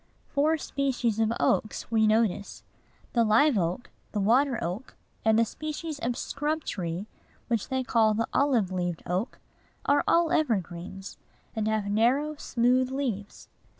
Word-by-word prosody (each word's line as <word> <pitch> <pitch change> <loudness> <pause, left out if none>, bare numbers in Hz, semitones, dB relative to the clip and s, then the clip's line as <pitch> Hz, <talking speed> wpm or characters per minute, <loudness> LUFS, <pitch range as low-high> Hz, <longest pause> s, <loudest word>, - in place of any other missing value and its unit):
Four 310 +3 +2
species 255 -6 -1
of 225 0 +2
oaks 215 +1 0
we 220 -1 +4
notice. 215 -2 0 0.5
The 235 - +4
live 230 +6 +4
oak, 180 +4 -1 0.2
the 210 - 0
water 245 +5 +3
oak, 180 +9 -5 0.3
and 220 0 +4
a 230 - +4
species 310 +3 -5
of 240 +1 -2
scrub 300 +3 -2
tree 175 +1 -4 0.4
which 230 -4 -1
they 260 0 0
call 220 -3 +3
the 230 +1 0
olive 250 -9 +2
leaved 175 -2 -2
oak, 185 +8 -2 0.5
are 285 - +3
all 335 -1 +3
evergreens, 195 - -2 0.4
and 215 -1 -1
have 220 -1 0
narrow, 260 +8 +2
smooth 255 -1 +1
leaves. 245 -7 -4
230 Hz, 145 wpm, -27 LUFS, 205-275 Hz, 0.5 s, we